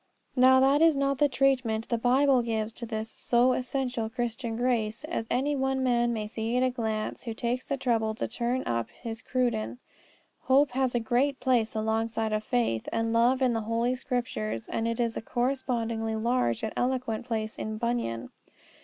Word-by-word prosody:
Now 260 0 +6
that 275 +3 +4
is 325 -3 +5
not 275 -1 0
the 290 - +4
treatment 250 -5 +1
the 235 - +1
Bible 260 +2 +4
gives 220 -1 -2
to 235 - -5
this 220 0 -4
so 245 +1 +2
essential 250 -3 -2
Christian 235 0 -3
grace, 230 -1 0
as 305 -8 -3
any 280 +4 +1
one 265 -1 0
may 240 -3 +1
see 225 +2 -2
at 255 - +3
a 255 - +2
glance 220 -3 -3
who 230 -2 -5
takes 245 +2 -2
the 275 - -2
trouble 225 -4 0
to - - -2
turn 240 +3 -1
up 115 -1 -1
his 225 -2 -7
Cruden. 245 -3 -1 0.7
Hope 270 +1 +4
has 260 -1 0
a - - +3
great 260 +4 +1
place 245 -4 +1
alongside 220 0 -1
of 215 0 0
faith 230 - 0
and 225 0 0
love 245 +3 +3
in 250 -2 +3
the 225 - -1
Holy 230 +3 0
Scriptures, 245 - -3
and 225 - -1
it 230 0 -1
has 235 -2 0
a - - -3
correspondingly 235 -3 -1
large 220 - 0
and 220 - -2
eloquent 245 -2 -1
place 220 -2 -2
in 215 0 -4
Bunyan. 235 - -2
240 Hz, 180 wpm, -28 LUFS, 225-255 Hz, 0.7 s, Now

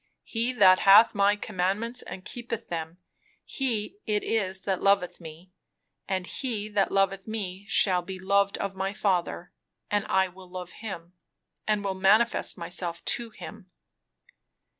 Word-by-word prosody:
"'He 230 +2 -1
that 190 -5 +6
hath 205 +4 +7
my 200 0 +3
commandments 210 +4 -2
and 185 - -9
keepeth 235 -2 -6
them, 165 0 -5 0.5
he 255 - -3
it 210 -1 0
is 195 -4 -1
that 190 -2 -2
loveth 195 -3 +2
me; 165 +3 -11 0.6
and 185 -2 -1
he 215 -2 -3
that 205 -2 +1
loveth 195 0 +1
me 200 -3 -5
shall 185 -4 +3
be 190 +2 -7
loved 200 +1 +1
of 200 -1 -3
my 190 +1 -2
Father; 180 -4 -1 0.4
and 205 0 +1
I 190 0 +3
will 185 0 -15
love 180 -1 -7
him, 180 -6 -8 0.5
and 210 -1 +1
will 195 -1 -1
manifest 205 +6 +3
myself 170 0 -4
to 235 -1 -1
him.'" 215 -3 -11
195 Hz, 145 wpm, -27 LUFS, 185-215 Hz, 0.6 s, hath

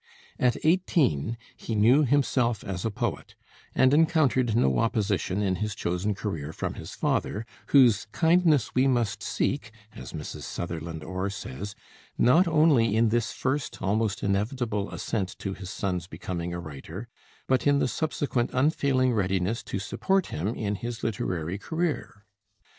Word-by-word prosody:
At 125 -2 +3
eighteen 150 - +2 0.2
he 115 - -4
knew 120 +8 +5
himself 125 -4 +1
as 95 -2 -4
a 115 - 0
poet, 105 - -4 0.4
and 130 +1 +5
encountered 145 -7 +3
no 65 - +3
opposition 105 -3 0
in 95 -2 +1
his 105 -1 -3
chosen 90 +4 -1
career 80 -8 -4
from - - -4
his - - -8
father, 110 +2 -1 0.2
whose 120 -7 +5
"kindness 160 -5 +3
we 130 +2 +3
must 120 -6 0
seek," 140 -4 -1 0.2
as 60 -2 -9
Mrs. - - -6
Sutherland 80 -2 -5
Orr 95 +3 -3
says, 100 +1 -6 0.4
"not 165 +9 +5
only 150 -9 +4
in 115 0 +4
this 120 +1 0
first, 135 +1 -2
almost 110 +3 0
inevitable 105 +1 -1
assent 95 -5 -3
to 95 - -4
his 95 -1 -8
son's 90 -3 -2
becoming 85 -2 -5
a 85 - -4
writer, 80 - -8 0.4
but 130 +2 +1
in 145 0 +5
the - - +2
subsequent 140 -4 -1
unfailing 130 -2 +2
readiness 95 +1 0
to - - -3
support 190 - 0
him 80 +6 -2
in 105 -2 -2
his 120 +3 -5
literary 90 -4 -2
career. 160 - -3
110 Hz, 145 wpm, -27 LUFS, 95-130 Hz, 0.4 s, knew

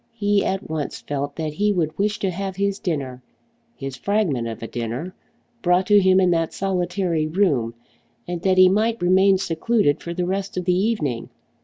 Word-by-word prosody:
He 205 -2 +2
at 190 0 -2
once 155 -2 -4
felt 145 0 -4
that 155 -2 -3
he 205 +6 +1
would 160 -5 -1
wish 210 +2 0
to 195 -4 -1
have 190 +1 -4
his 200 +1 -1
dinner, 135 -7 -3 0.5
his 135 -1 -6
fragment 155 - 0
of 115 0 -6
a - - -4
dinner, 120 +11 -4 0.5
brought 180 +1 +3
to 205 +1 +6
him 190 -1 +4
in 185 -1 +3
that 165 -1 0
solitary 180 -4 -1
room, 150 - +1 0.5
and 175 -1 -4
that 185 0 +2
he 185 0 +8
might 220 +4 +1
remain 190 +2 +4
secluded 185 -1 +1
for 170 0 -6
the 180 0 -1
rest 195 +1 -3
of 180 - -2
the 180 - +3
evening. 180 - -1
180 Hz, 185 wpm, -22 LUFS, 155-195 Hz, 0.5 s, he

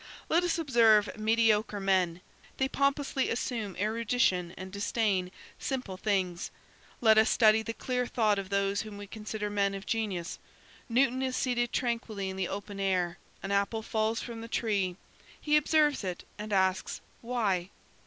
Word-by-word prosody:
Let 340 +2 +3
us 350 -1 +1
observe 230 -9 +4
mediocre 220 -1 +2
men; 185 -3 +1 0.4
they 265 - +2
pompously 275 0 0
assume 225 -5 -2
erudition 215 -4 +1
and 185 0 -7
disdain 200 -2 0 0.3
simple 255 -8 -3
things. 185 -3 -1 0.5
Let 220 -2 +6
us 220 - +4
study 220 -1 +5
the 225 +1 -5
clear 250 -1 -1
thought 215 -5 +2
of 190 -1 -6
those 200 0 +1
whom 215 -2 -8
we 205 - -7
consider 210 0 -5
men 200 -1 +1
of 195 - -7
genius. 200 -7 -2 0.5
Newton 255 +2 +2
is 260 -1 -1
seated 240 -2 0
tranquilly 225 -5 -2
in - - -7
the 190 -2 -1
open 200 0 -6
air; 185 -3 0 0.2
an 195 - -3
apple 200 +3 0
falls 220 +1 0
from 230 -2 -7
the 230 - -7
tree, 200 -6 0 0.4
he 300 0 +2
observes 300 -3 +3
it 180 -2 -4 0.2
and 210 0 -6
asks, 190 0 +1 0.2
"Why?" 210 -7 0
215 Hz, 155 wpm, -30 LUFS, 195-235 Hz, 0.5 s, Let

